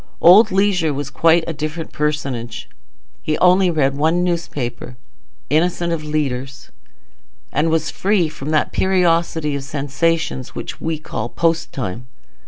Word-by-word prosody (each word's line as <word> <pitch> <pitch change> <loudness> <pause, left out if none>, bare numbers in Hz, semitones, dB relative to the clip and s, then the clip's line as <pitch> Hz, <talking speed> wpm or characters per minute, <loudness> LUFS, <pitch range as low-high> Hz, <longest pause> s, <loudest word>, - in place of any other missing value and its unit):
Old 205 +6 +7
Leisure 185 -6 +1
was 140 -1 -4
quite 165 +3 +3
a 165 - -3
different 155 +2 -5
personage. 140 -6 -3 0.5
He 155 - -1
only 180 +1 +4
read 140 -5 +1
one 160 +5 +1
newspaper, 130 -9 -3 0.5
innocent 170 +2 +1
of 160 -2 -3
leaders, 140 -3 -3 0.8
and 150 +3 +1
was 160 -1 0
free 195 -4 +1
from 150 -2 -7
that 155 -1 +1
periodicity 170 -5 +1
of 140 - -4
sensations 145 0 -2
which - - -6
we 160 -1 -2
call 120 -6 -5
post 165 +2 0
time. 120 -1 -5
155 Hz, 135 wpm, -19 LUFS, 140-170 Hz, 0.8 s, Old